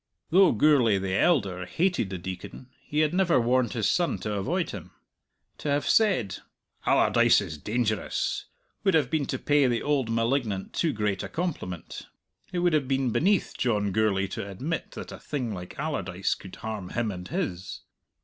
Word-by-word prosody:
Though 185 Hz, +2 st, +6 dB
Gourlay 120 Hz, -4 st, +4 dB
the 95 Hz, -1 st, -2 dB
elder 95 Hz, -, +2 dB
hated 175 Hz, -, 0 dB
the 95 Hz, -, -4 dB
Deacon, 95 Hz, +8 st, -8 dB, 0.2 s
he 150 Hz, +1 st, +1 dB
had 155 Hz, 0 st, +2 dB
never 180 Hz, -6 st, +3 dB
warned 125 Hz, +1 st, +2 dB
his 110 Hz, -4 st, 0 dB
son 175 Hz, -1 st, +1 dB
to 105 Hz, -, -2 dB
avoid 100 Hz, -2 st, -1 dB
him. -, -, -8 dB, 0.7 s
To 150 Hz, -, -3 dB
have 145 Hz, 0 st, +1 dB
said 160 Hz, -, +3 dB, 0.5 s
"Allardyce -, -, +5 dB
is 75 Hz, -, -6 dB
dangerous" 110 Hz, +2 st, -1 dB, 0.4 s
would 195 Hz, -4 st, +3 dB
have 145 Hz, -6 st, +2 dB
been 155 Hz, -3 st, 0 dB
to -, -, -2 dB
pay 145 Hz, -2 st, +3 dB
the 120 Hz, -2 st, 0 dB
old 140 Hz, -5 st, +1 dB
malignant 115 Hz, -3 st, 0 dB
too 165 Hz, -, +1 dB
great 105 Hz, -4 st, -1 dB
a -, -, -5 dB
compliment; 150 Hz, -, -4 dB, 0.4 s
it 180 Hz, -, -3 dB
would 175 Hz, -1 st, +2 dB
have 145 Hz, -4 st, +2 dB
been 135 Hz, -2 st, +1 dB
beneath 195 Hz, -, +2 dB
John 105 Hz, -5 st, 0 dB
Gourlay 100 Hz, -1 st, +2 dB
to 100 Hz, -, -5 dB
admit 140 Hz, -, -4 dB
that -, -, -7 dB
a -, -, -8 dB
thing 125 Hz, -7 st, -3 dB
like 90 Hz, -2 st, -8 dB
Allardyce 95 Hz, -, -1 dB
could 95 Hz, -, -10 dB
harm 110 Hz, -5 st, -5 dB
him 115 Hz, -3 st, -1 dB
and 90 Hz, -2 st, -7 dB
his. 120 Hz, -, -4 dB
120 Hz, 175 wpm, -27 LUFS, 100-150 Hz, 0.7 s, Though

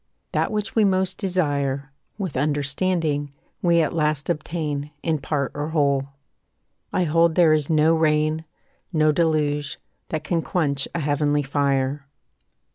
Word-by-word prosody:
That -, -, +1 dB
which 210 Hz, -1 st, -2 dB
we 220 Hz, -, +4 dB
most 190 Hz, -2 st, +1 dB
desire, 145 Hz, -7 st, -1 dB, 0.2 s
With 190 Hz, -8 st, -4 dB
understanding, 145 Hz, +1 st, 0 dB, 0.3 s
we 170 Hz, -2 st, +4 dB
at 155 Hz, -, -2 dB
last 150 Hz, -1 st, 0 dB
obtain, 150 Hz, -2 st, -3 dB
In 160 Hz, -2 st, 0 dB
part 140 Hz, -1 st, -2 dB
or 145 Hz, +1 st, -3 dB
whole. 140 Hz, -3 st, +1 dB, 0.8 s
I 180 Hz, -, +1 dB
hold 165 Hz, 0 st, +3 dB
there 170 Hz, -3 st, +5 dB
is 150 Hz, -2 st, 0 dB
no 155 Hz, 0 st, +4 dB
rain, 155 Hz, 0 st, +2 dB, 0.5 s
No 155 Hz, -3 st, +3 dB
deluge, 150 Hz, -3 st, 0 dB, 0.3 s
that 155 Hz, -1 st, -3 dB
can 170 Hz, -2 st, 0 dB
quench 145 Hz, -7 st, 0 dB
a -, -, 0 dB
heavenly 145 Hz, 0 st, +1 dB
fire. 140 Hz, 0 st, 0 dB
150 Hz, 135 wpm, -23 LUFS, 145-165 Hz, 0.8 s, there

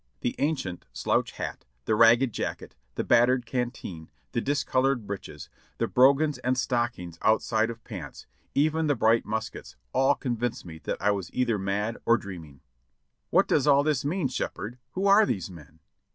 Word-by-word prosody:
The 120 Hz, -, -1 dB
ancient 135 Hz, -, -2 dB
slouch -, -, 0 dB
hat, -, -, -6 dB, 0.2 s
the -, -, +1 dB
ragged 115 Hz, +2 st, +5 dB
jacket, -, -, -4 dB, 0.2 s
the -, -, -1 dB
battered 120 Hz, +1 st, +3 dB
canteen, 120 Hz, -10 st, -4 dB, 0.2 s
the 115 Hz, -, -1 dB
discolored 135 Hz, -3 st, 0 dB
breeches, 100 Hz, -1 st, -7 dB, 0.3 s
the -, -, +1 dB
brogans 140 Hz, +2 st, +4 dB
and 125 Hz, 0 st, 0 dB
stockings 120 Hz, -10 st, -2 dB
outside 110 Hz, 0 st, +2 dB
of 115 Hz, -1 st, -8 dB
pants, -, -, -8 dB, 0.3 s
even 155 Hz, +2 st, +2 dB
the 145 Hz, -, +2 dB
bright 115 Hz, 0 st, +2 dB
muskets, 110 Hz, -, -5 dB, 0.2 s
all 135 Hz, +1 st, +3 dB
convinced 120 Hz, -2 st, -3 dB
me 80 Hz, -2 st, -9 dB
that -, -, -2 dB
I 105 Hz, -, +2 dB
was 95 Hz, -4 st, -4 dB
either 120 Hz, -4 st, +1 dB
mad 100 Hz, +4 st, -2 dB
or 115 Hz, 0 st, +4 dB
dream 95 Hz, -7 st, -8 dB
ing. 70 Hz, -3 st, -18 dB, 0.7 s
"What -, -, +4 dB
does 145 Hz, -, +2 dB
all 140 Hz, 0 st, +5 dB
this 150 Hz, -4 st, 0 dB
mean. 155 Hz, +1 st, 0 dB
Shepherd; 125 Hz, -1 st, -5 dB
who 190 Hz, +2 st, -2 dB
are 200 Hz, +2 st, +7 dB
these 95 Hz, -, -2 dB
men?" 80 Hz, -2 st, -14 dB
120 Hz, 165 wpm, -27 LUFS, 105-135 Hz, 0.7 s, are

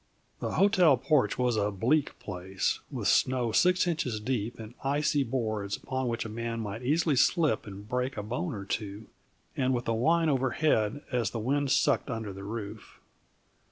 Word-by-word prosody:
The -, -, -3 dB
hotel 180 Hz, -8 st, +5 dB
porch 130 Hz, -5 st, +2 dB
was 125 Hz, -2 st, +1 dB
a 105 Hz, 0 st, +1 dB
bleak 125 Hz, +10 st, +1 dB
place, 95 Hz, -1 st, -2 dB
with -, -, -3 dB
snow 125 Hz, -3 st, +2 dB
six 180 Hz, +9 st, +4 dB
inches 140 Hz, -10 st, -1 dB
deep 115 Hz, 0 st, -2 dB
and 110 Hz, +1 st, -9 dB
icy 145 Hz, +1 st, +1 dB
boards 110 Hz, -5 st, -2 dB
upon 130 Hz, -1 st, -3 dB
which 115 Hz, -1 st, -2 dB
a -, -, -3 dB
man 115 Hz, +1 st, -4 dB
might 110 Hz, +1 st, -5 dB
easily 150 Hz, +3 st, +2 dB
slip 140 Hz, -, +2 dB
and 100 Hz, +1 st, -9 dB
break 125 Hz, +2 st, -2 dB
a 105 Hz, -, -3 dB
bone 125 Hz, -, -3 dB
or 100 Hz, -1 st, -6 dB
two, 105 Hz, +1 st, -4 dB, 0.5 s
and 130 Hz, -1 st, +1 dB
with 120 Hz, -, -3 dB
a 115 Hz, -, +2 dB
whine 165 Hz, +8 st, +2 dB
overhead 135 Hz, -3 st, +1 dB
as 120 Hz, -6 st, +1 dB
the 115 Hz, -, -5 dB
wind 140 Hz, +5 st, 0 dB
sucked -, -, +2 dB
under 110 Hz, -4 st, -4 dB
the 100 Hz, +1 st, -9 dB
roof. 105 Hz, 0 st, -7 dB
120 Hz, 175 wpm, -29 LUFS, 105-140 Hz, 0.5 s, hotel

